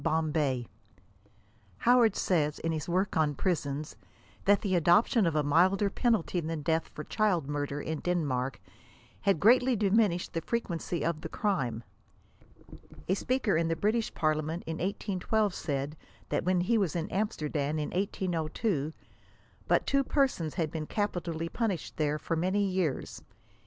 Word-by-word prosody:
BOMBAY. 150 -6 0 1.1
Howard 240 - +4
says, 155 -5 +1
in 165 - -2
his 155 0 -3
work 185 +3 0
on 150 -2 +2
prisons, 150 -5 -2 0.5
that 200 0 +4
the 195 -3 -1
adoption 180 - +4
of 165 - 0
a 150 - +2
milder 185 +7 +3
penalty 220 -7 +1
than 160 -2 -4
death 160 +1 +1
for 150 - -8
child 185 -9 +1
murder, 145 0 -2
in 155 +1 -3
Denmark, 140 -8 -1 0.3
«* - - -28
had 195 -5 +2
greatly 245 - +5
diminished 200 -3 +2
the 165 - -1
frequency 175 -4 -2
of 165 -2 -1
the - - -6
crime." 135 - -1 1.2
A 185 - +2
speaker 245 0 0
in 165 +1 +2
the 165 - 0
British 220 +5 0
Parliament 155 +1 0
in 160 0 -4
1812 200 +2 -1
said, 145 -1 -3 0.3
that - - -1
when 180 -1 +2
he 225 +5 +2
was 190 -5 0
in 165 -1 -1
Amsterdam 155 -7 -1
in 150 -1 -2
1802, 175 -3 -1 0.7
but - - +3
two 275 0 +2
persons 260 - 0
had 160 -4 -1
been 155 -2 -4
capitally 175 -5 -2
punished 200 -3 -3
there 150 -1 +1
for 165 - -2
many 190 +5 +1
years. 185 -7 -2
170 Hz, 150 wpm, -30 LUFS, 155-200 Hz, 1.2 s, greatly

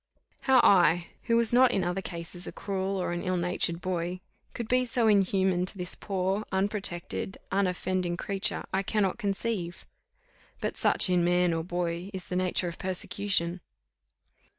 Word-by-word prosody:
How 265 -2 +5
I, 175 -3 +4 0.2
who 230 -1 +3
was 235 0 +2
not 255 +1 +6
in 195 -6 0
other 180 +2 -1
cases 175 0 -5
a - - -5
cruel 195 -1 -3
or 180 - -2
an 175 0 -3
ill 185 0 -1
natured 175 -1 0
boy, 180 0 -2 0.4
could 235 -2 -4
be 250 +1 +3
so 240 -1 0
inhuman 190 -3 +2
to 195 - -2
this 180 -1 -4
poor, 195 +1 -2
unprotected, 190 -2 -2
unoffending 185 -2 0
creature 195 0 +2
I 190 - +2
cannot 200 +1 0
conceive; 200 -4 -3 0.7
but - - -3
such - - +3
in 180 -1 +2
man 175 0 +3
or 165 0 -1
boy 175 +1 -3
is 185 - -5
the 180 - -5
nature 180 0 0
of 170 - -6
persecution. 185 -1 -1
185 Hz, 160 wpm, -28 LUFS, 175-200 Hz, 0.7 s, not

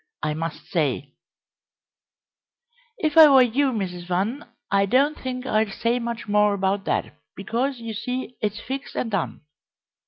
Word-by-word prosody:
I 150 0 0
must 165 +1 -5
say 140 -4 -1 1.3
" 485 0 -40
"If 310 +1 +4
I 315 - +11
were 265 -2 +7
you, 260 +3 +1
Mrs. 180 -6 -4
Van, 200 +11 -1 0.2
I 200 0 +3
don't 280 +7 +3
think 255 -2 -5
I'd 215 -4 +1
say 235 +2 0
much 235 -2 -5
more 210 0 +3
about 195 0 -1
that, - - -1 0.2
because, 245 +7 -2
you 230 -1 -6
see, 250 +3 -4
it's 210 0 -2
fixed 270 +3 -6
and 225 - -2
done. 195 -5 -2
230 Hz, 155 wpm, -24 LUFS, 195-260 Hz, 1.3 s, I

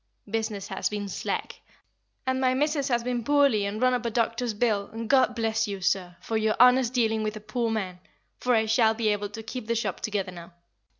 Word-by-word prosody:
Business 215 -1 -3
has 190 - -1
been 205 -1 -4
slack, - - -4 0.6
and 260 0 0
my 255 -1 +3
missis 290 0 +1
has 240 -3 +1
been 245 -1 -2
poorly 275 -6 +3
and 205 +2 -4
run 255 +1 +3
up 245 - -1
a 235 - 0
doctor's 230 0 -1
bill, 205 -3 0
and 225 +1 -5
God 260 0 +4
bless 225 -1 0
you, 200 -1 -4
sir, 180 -1 0
for 225 - -2
your 220 0 +1
honest 250 0 +6
dealing 225 -3 +1
with 215 0 -2
a - - -6
poor 230 +2 -2
man, 190 -5 -3 0.4
for 250 -1 +2
I 220 0 +3
shall 220 0 +3
be 220 -1 +1
able 205 -1 -1
to 225 +2 -8
keep 235 0 -6
the 230 - 0
shop 230 - -2
together 205 -4 -2
now." 170 0 -11
225 Hz, 220 wpm, -27 LUFS, 210-245 Hz, 0.6 s, honest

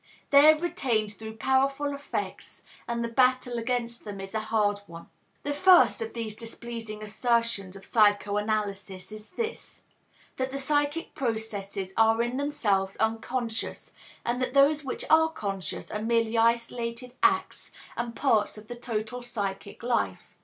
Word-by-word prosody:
They 285 +2 +9
are 310 - +1
retained 235 -10 -1
through 220 +1 -8
powerful 275 +3 +1
affects, 280 +1 -5 0.2
and 235 0 -1
the - - -1
battle 250 0 +2
against 235 0 -2
them 205 -2 -7
is 195 +1 -7
a 220 - 0
hard 215 -2 +1
one. 170 0 -11 0.3
The 290 - -1
first 350 -8 +6
of 225 0 -4
these 225 -2 -4
displeasing 225 -1 -7
assertions 225 -3 0
of 195 0 -11
psychoanalysis 205 -2 +1
is 215 0 -9
this, 460 +4 -5 0.5
that 260 0 -1
the 275 - -3
psychic 290 +3 0
processes 205 -5 -3
are 225 +1 +4
in 240 +2 -2
themselves 205 -10 0
unconscious, 225 +1 -2 0.3
and 245 +2 0
that 255 +1 -2
those 290 +2 +5
which 265 - -3
are 320 0 +5
conscious 195 - -4
are 210 - -3
merely 230 0 +1
isolated 235 +1 0
acts 385 0 +1 0.2
and 235 -1 -3
parts 220 -7 +2
of 215 0 -12
the 240 - -5
total 235 0 -4
psychic 205 -4 -5
life. 240 0 -1
230 Hz, 145 wpm, -28 LUFS, 215-260 Hz, 0.5 s, They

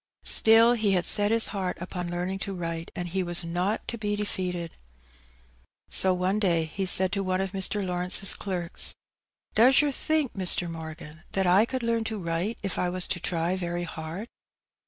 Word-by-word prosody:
Still 225 +2 +5
he 215 -4 0
had 180 -2 0
set 205 -1 +5
his 225 0 +4
heart 190 -3 -4
upon 180 0 -6
learning 180 +2 -4
to 195 0 -5
write, 165 -1 -5
and 175 - -4
he 190 +2 -2
was 175 -1 +4
not 180 +5 -3
to 235 - -5
be 210 -1 -2
defeated. 180 -5 -4 1.2
So 190 - +4
one 185 +3 -1
day 170 -5 +1
he 190 +5 -4
said 185 0 +6
to 200 0 -2
one 185 0 -1
of 195 -1 -3
Mr, 195 +1 -2
Lawrence^s 180 +1 +3
clerks 180 -3 -2 0.3
— - - -45
^^Does 255 +5 +5
yer 295 -1 +1
think, 305 0 -1
Mr. 180 -2 +3
Morgan, 160 -1 -9
that 190 -1 +1
I 185 +5 +4
could 260 0 -5
learn 230 -1 -1
to 220 -1 -4
write 175 +4 -3
if 195 - -3
I 180 - 0
was 180 0 +2
to 190 -1 -1
try 170 +1 -1
very 175 -1 -4
hard 165 +5 -7
185 Hz, 190 wpm, -26 LUFS, 175-205 Hz, 1.2 s, said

